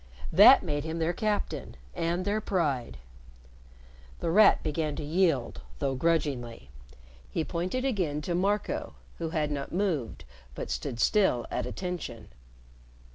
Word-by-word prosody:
That -, -, +8 dB
made 145 Hz, -1 st, -2 dB
him 160 Hz, +1 st, -4 dB
their 165 Hz, +1 st, 0 dB
captain 210 Hz, -, -2 dB, 0.2 s
and 170 Hz, +2 st, -1 dB
their 210 Hz, +2 st, 0 dB
pride. 140 Hz, -, -1 dB, 1.2 s
The 165 Hz, -, -1 dB
Rat 215 Hz, +5 st, +6 dB
began 155 Hz, -1 st, -1 dB
to 150 Hz, -, -5 dB
yield, 160 Hz, -5 st, +1 dB, 0.2 s
though 135 Hz, -, -1 dB
grudgingly. 135 Hz, -, -1 dB, 0.6 s
He 165 Hz, -, -1 dB
pointed 185 Hz, +11 st, -2 dB
again 180 Hz, -, -1 dB
to 175 Hz, -, -2 dB
Marco, 200 Hz, +4 st, -1 dB, 0.2 s
who 165 Hz, -1 st, -2 dB
had 155 Hz, -3 st, -1 dB
not 140 Hz, -1 st, -4 dB
moved, 170 Hz, -, -2 dB, 0.3 s
but -, -, -5 dB
stood 115 Hz, -, -3 dB
still 160 Hz, -, +3 dB
at -, -, -2 dB
attention. 180 Hz, -, -5 dB
165 Hz, 130 wpm, -28 LUFS, 145-185 Hz, 1.2 s, That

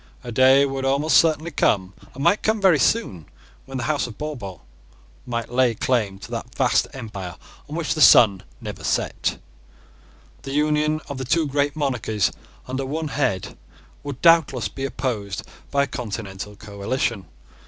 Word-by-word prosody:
A 120 Hz, -, -6 dB
day 130 Hz, +4 st, +6 dB
would 135 Hz, -1 st, -3 dB
almost 140 Hz, +4 st, +3 dB
certainly 160 Hz, 0 st, +2 dB
come, 95 Hz, -9 st, +1 dB, 0.2 s
and 135 Hz, -, -5 dB
might 205 Hz, -, +3 dB
come 220 Hz, 0 st, +1 dB
very 185 Hz, -7 st, +5 dB
soon, 100 Hz, -, 0 dB, 0.4 s
when 135 Hz, 0 st, -5 dB
the 125 Hz, -, -3 dB
House 145 Hz, -1 st, 0 dB
of 115 Hz, -, -10 dB
Bourbon 120 Hz, -, -6 dB, 0.7 s
might 115 Hz, -1 st, -3 dB
lay 125 Hz, -2 st, +3 dB
claim 105 Hz, -5 st, 0 dB
to 100 Hz, -, -11 dB
that 120 Hz, +1 st, -6 dB
vast 130 Hz, -2 st, +2 dB
empire 100 Hz, -, -7 dB, 0.3 s
on 150 Hz, -, -5 dB
which 165 Hz, -1 st, -1 dB
the 155 Hz, -, -3 dB
sun 100 Hz, -9 st, +7 dB, 0.2 s
never -, -, -7 dB
set. -, -, -1 dB, 1.0 s
The 135 Hz, -, -6 dB
union 150 Hz, +1 st, +1 dB
of 135 Hz, -2 st, -5 dB
two 160 Hz, +2 st, +3 dB
great 145 Hz, +1 st, 0 dB
monarchies 115 Hz, -, 0 dB, 0.4 s
under 130 Hz, +1 st, -3 dB
one 155 Hz, +3 st, -3 dB
head 130 Hz, -10 st, -1 dB, 0.5 s
would 140 Hz, -3 st, -6 dB
doubtless 160 Hz, -9 st, +4 dB
be 135 Hz, -, -5 dB
opposed 115 Hz, -7 st, -3 dB, 0.3 s
by 140 Hz, +1 st, +2 dB
a -, -, -2 dB
continental 105 Hz, -4 st, -6 dB
coalition. 100 Hz, +1 st, -3 dB
130 Hz, 155 wpm, -23 LUFS, 110-150 Hz, 1.0 s, sun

